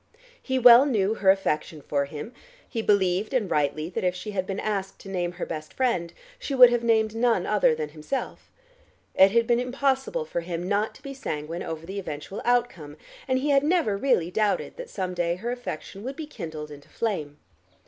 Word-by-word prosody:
He 260 -1 -1
well 245 +2 +8
knew 210 -5 +1
her 200 -3 +2
affection 165 -5 +1
for 140 0 -1
him; 150 - -8 0.3
he 230 - -3
believed, 200 +2 +1
and 215 -7 0
rightly, 150 +1 0
that - - -3
if 180 0 +1
she 210 +3 -6
had 190 -2 -2
been 195 0 -3
asked 195 -3 -3
to 195 - -10
name 175 -2 -2
her 180 - -4
best 155 -2 -7
friend, 235 -10 0 0.3
she 275 - -3
would 250 -2 +9
have 240 -1 0
named 220 -2 +2
none 225 -5 +2
other 205 -6 +3
than 155 -1 -4
himself. 155 - -5 0.6
It 190 - +7
had 230 +3 +2
been 235 0 +2
impossible 265 - -1
for 170 - -3
him 170 +1 -4
not 205 +2 0
to - - -17
be 275 - -6
sanguine 165 - -5
over 160 0 -5
the 195 +3 -5
eventual 155 +2 -6
outcome, 235 -12 0 0.3
and 260 -1 +2
he 285 +3 0
had 275 -1 +5
never 300 - +1
really 200 -7 +1
doubted 210 +1 0
that - - -7
some 185 -2 -3
day 175 -1 0
her 230 +7 -4
affection 230 -6 -6
would 265 +3 -5
be 315 - -6
kindled 160 - -7
into 145 -1 -13
flame. 155 -11 -3
200 Hz, 200 wpm, -26 LUFS, 170-245 Hz, 0.6 s, would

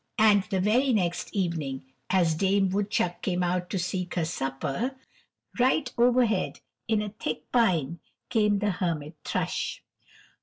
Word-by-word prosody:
And 215 -2 +6
the 195 -3 -1
very 240 +7 +3
next 175 -5 0
evening 160 -10 -2 0.2
as 175 -4 +3
Dame 195 +3 +2
Woodchuck 195 -2 0
came 180 -1 0
out 180 0 -1
to 195 - -2
seek 180 0 -3
her 170 -3 +1
supper, 140 - -2 0.6
right 255 +1 +2
overhead 240 -4 +2 0.3
in 220 -2 +2
a 210 - -4
thick 155 -7 -5
pine 170 - +2 0.3
came 210 -3 +3
the 205 +1 +1
Hermit 165 -5 -3
Thrush. - - -2
190 Hz, 140 wpm, -27 LUFS, 170-215 Hz, 0.6 s, And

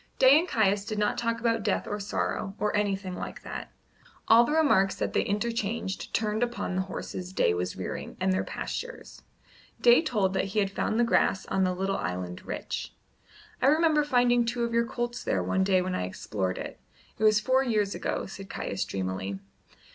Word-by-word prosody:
Day 265 +3 +7
and 345 - -2
Caius 205 - +2
did 215 0 -4
not 210 0 +1
talk 230 -1 -1
about 230 0 +1
death 205 -1 0
or 205 - -3
sorrow, 200 0 -2
or 210 0 0
anything 195 -2 -1
like - - -7
that. - - -7 0.6
All 230 +1 +8
the 240 - -1
remarks 285 -12 +3
that - - -2
they - - +3
interchanged 210 -1 -2
turned 215 0 0
upon 240 -6 -1
the 190 - +1
horses 185 -1 -6
Day 85 - +2
was 90 +1 -2
rearing - - -6
and 185 0 +2
their 185 - 0
pastures. - - -6 0.6
Day 240 +3 +6
told 210 - 0
that - - +1
he 195 +2 -5
had 195 -1 +1
found 220 +3 -1
the - - +5
grass 230 -4 +2
on 190 - 0
the 185 0 0
little 195 +1 -1
island 90 0 -4
rich. - - -5 0.7
"I 260 - +4
remember 310 0 +4
finding 245 -4 +3
two 235 +1 -1
of 235 0 -2
your 235 0 +2
colts 240 -1 -3
there - - 0
one 190 - +1
day 190 -1 +3
when 185 0 -2
I 90 - -1
explored 95 0 -3
it. - - -7 0.4
It - - -2
was 215 -1 +6
four 260 +4 +2
years 210 -6 +1
ago," - - -2
said 195 0 -9
Caius 95 - -3
dreamily. 95 0 -3
210 Hz, 195 wpm, -28 LUFS, 190-240 Hz, 0.7 s, All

